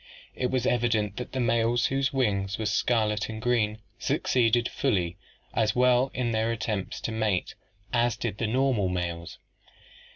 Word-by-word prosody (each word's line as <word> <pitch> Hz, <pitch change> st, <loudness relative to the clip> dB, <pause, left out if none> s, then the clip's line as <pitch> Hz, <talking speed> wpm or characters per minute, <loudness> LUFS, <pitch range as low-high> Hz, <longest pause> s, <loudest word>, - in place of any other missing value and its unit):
It 125 Hz, -, 0 dB
was 130 Hz, -2 st, 0 dB
evident 110 Hz, -5 st, +1 dB
that 125 Hz, -, -5 dB
the 130 Hz, -, -3 dB
males 115 Hz, 0 st, +2 dB
whose 135 Hz, 0 st, +1 dB
wings 100 Hz, -7 st, 0 dB
were 110 Hz, -, -3 dB
scarlet 110 Hz, -1 st, +1 dB
and 110 Hz, -1 st, -5 dB
green 110 Hz, -3 st, +1 dB, 0.2 s
succeeded 120 Hz, -1 st, +2 dB
fully 90 Hz, -10 st, 0 dB, 0.4 s
as 110 Hz, -1 st, +1 dB
well 125 Hz, +1 st, +4 dB
in 120 Hz, -2 st, 0 dB
their 110 Hz, +1 st, +1 dB
attempts 105 Hz, -3 st, -3 dB
to -, -, -3 dB
mate 110 Hz, -4 st, 0 dB, 0.4 s
as 120 Hz, -1 st, +2 dB
did 115 Hz, -3 st, -3 dB
the 115 Hz, -, 0 dB
normal 125 Hz, -4 st, +1 dB
males." 85 Hz, -2 st, -4 dB
115 Hz, 155 wpm, -27 LUFS, 105-125 Hz, 0.4 s, well